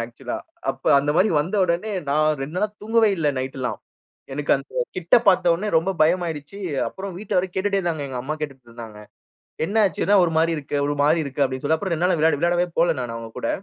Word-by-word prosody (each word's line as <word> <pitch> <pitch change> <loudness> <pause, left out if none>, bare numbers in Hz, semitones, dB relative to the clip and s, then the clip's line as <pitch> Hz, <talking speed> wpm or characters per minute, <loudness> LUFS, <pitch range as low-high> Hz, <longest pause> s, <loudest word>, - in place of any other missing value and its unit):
ஆக்சுவல்ஆ 120 - -6 0.3
அப்ப - - -11
அந்த 145 +1 0
மாதிரி 205 +4 +4
வந்த 175 +8 -4
உடனே 180 +5 -1 0.2
நான் 155 +2 +3
2 135 +5 -6
நாளா 210 +3 +1
தூங்கவே 225 0 +3
இல்ல 155 -3 +1
நைட் 130 +1 -4
எல்லாம். 125 - -3 0.5
எனக்கு 145 +1 -3
அந்த 135 - -11 0.2
கிட்ட 170 -1 +2
பார்த்த 180 -2 +4
உடனே 210 +5 -3
ரொம்ப 185 +4 -1
பயமாயிடுச்சு. 165 +1 -1 0.3
அப்புறம் 190 -1 -7
வீட்டில 195 -3 -1
வேற 185 - +1
கேட்டுட்டே 200 +1 0
இருந்தாங்க. 165 -6 -2
எங்க 130 -2 -5
அம்மா 150 +4 -3
கேட்டுட்டு 135 -5 -7
இருந்தாங்க. 115 -2 -10 0.7
"என்னாச்சு 200 -3 +1
என்னா 205 +1 +4
ஒரு 165 - -1
மாரி 165 +1 +3
இருக்கு, 145 0 -4
ஒரு 145 - 0
மாரி 155 +3 +4
இருக்க?" 140 +1 -6
அப்படின்னு 130 +1 -4
சொல்லி. 160 +2 +2
அப்புறம் 185 +1 -3
2 170 +2 +1
நாள் 175 -3 +1
விளையாட 160 -2 +3
விளையாடவே 175 +2 +2
போகல 170 -1 +3
நான் 120 -2 -4
அவங்க 115 0 -7
கூட. - - -2
165 Hz, 210 wpm, -23 LUFS, 140-185 Hz, 0.7 s, மாதிரி